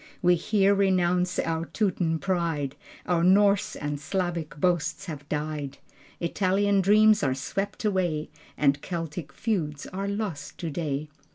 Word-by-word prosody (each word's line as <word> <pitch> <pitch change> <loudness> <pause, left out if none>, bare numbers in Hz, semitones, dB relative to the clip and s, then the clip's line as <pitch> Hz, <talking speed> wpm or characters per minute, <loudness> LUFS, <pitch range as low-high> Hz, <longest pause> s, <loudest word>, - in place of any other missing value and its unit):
We 180 0 +6
here 200 +3 +3
renounce 180 -2 +2
our 165 0 -1
Teuton 165 -2 0
pride: 165 -6 -1 0.3
Our 175 -2 +1
Norse 200 +2 +4
and 145 -1 -3
Slavic 170 -1 -3
boasts 175 +2 0
have 150 -5 -8
died: 150 -2 -3 0.4
Italian 195 +3 +2
dreams 215 +2 +5
are 135 -3 +1
swept 195 - -3
away, 175 -7 0 0.3
And 140 -1 +2
Celtic 165 -3 -5
feuds 155 -7 -2
are 195 +2 -4
lost 200 -8 -4
today.... 155 -3 -3
175 Hz, 125 wpm, -27 LUFS, 150-195 Hz, 0.4 s, We